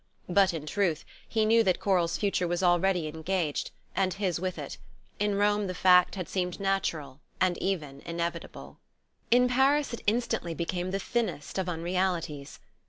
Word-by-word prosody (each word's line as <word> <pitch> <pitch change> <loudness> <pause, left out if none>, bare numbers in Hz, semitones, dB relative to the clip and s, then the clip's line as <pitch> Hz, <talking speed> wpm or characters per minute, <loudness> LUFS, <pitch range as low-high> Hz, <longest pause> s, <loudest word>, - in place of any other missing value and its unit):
But 190 +1 +4
in 160 -3 -5
truth 165 -1 0 0.2
he 220 -1 +1
knew 225 +1 +5
that 185 -5 +2
Coral's 175 -4 +1
future 195 -3 0
was 175 +2 -1
already 175 -1 +3
engaged, 160 0 -2 0.3
and 185 -2 +1
his 190 -4 -1
with 185 0 -3
it: - - -7 0.4
in 205 -1 +1
Rome 205 0 +2
the 185 - -4
fact 180 0 +5
had 185 -3 -4
seemed 180 -2 -2
natural 165 -8 -1 0.2
and 185 -1 +2
even 150 -8 -3
inevitable. 170 0 -5 0.5
In 250 +1 +5
Paris, 270 +3 +2
it 235 - -5
instantly 220 -6 0
became 175 +2 -2
the 195 - -1
thinnest 205 -7 -2
of 185 -1 -1
unrealities. 170 -4 -2
185 Hz, 160 wpm, -28 LUFS, 170-200 Hz, 0.5 s, knew